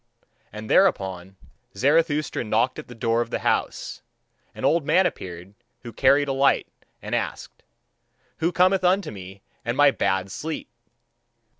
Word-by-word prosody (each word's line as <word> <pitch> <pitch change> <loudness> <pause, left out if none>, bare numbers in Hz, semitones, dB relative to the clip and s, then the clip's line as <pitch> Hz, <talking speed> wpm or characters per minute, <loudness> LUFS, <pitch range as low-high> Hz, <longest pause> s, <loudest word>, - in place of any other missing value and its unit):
And 110 +1 -8
thereupon 95 - +1 0.4
Zarathustra 150 - +1
knocked 115 +4 0
at - - -9
the 120 - -11
door 115 0 0
of 120 - -4
the - - -2
house. - - -1 0.5
An - - -4
old 165 -1 +3
man 175 +6 +3
appeared, 90 - -5 0.3
who 120 -2 -9
carried 140 +2 +3
a 135 - -1
light, 135 +1 +2 0.4
and - - -6
asked: - - -4 0.8
"Who 165 +2 0
cometh 185 +2 +3
unto 185 - +2
me 95 -1 -11 0.2
and 120 +2 -3
my 145 -1 +6
bad 95 -4 -1
sleep?" 155 +9 -5
130 Hz, 145 wpm, -24 LUFS, 100-160 Hz, 0.8 s, my